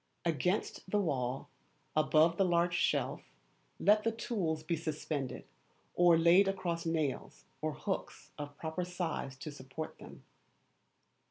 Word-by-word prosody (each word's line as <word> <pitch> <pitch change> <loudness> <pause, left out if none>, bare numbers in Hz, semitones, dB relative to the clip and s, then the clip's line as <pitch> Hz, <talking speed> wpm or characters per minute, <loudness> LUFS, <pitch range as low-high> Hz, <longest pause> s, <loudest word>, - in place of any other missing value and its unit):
Against 180 +5 0
the 210 - +2
wall, 135 -9 -1 0.5
above 155 +2 +4
the 195 - +4
large 175 -1 +2
shelf, 170 - +1 0.6
let 210 +1 +5
the 230 - +2
tools 190 -9 -2
be 165 +2 0
suspended, 150 -3 -3 0.5
or 175 -1 +6
laid 170 +4 +6
across 175 -4 -1
nails 155 -5 -2 0.2
or - - -1
hooks - - -4
of 145 -1 -7
proper 160 +2 -3
size 175 -6 -3
to 150 - -6
support 140 +2 -7
them. - - -12
165 Hz, 125 wpm, -33 LUFS, 155-180 Hz, 0.6 s, or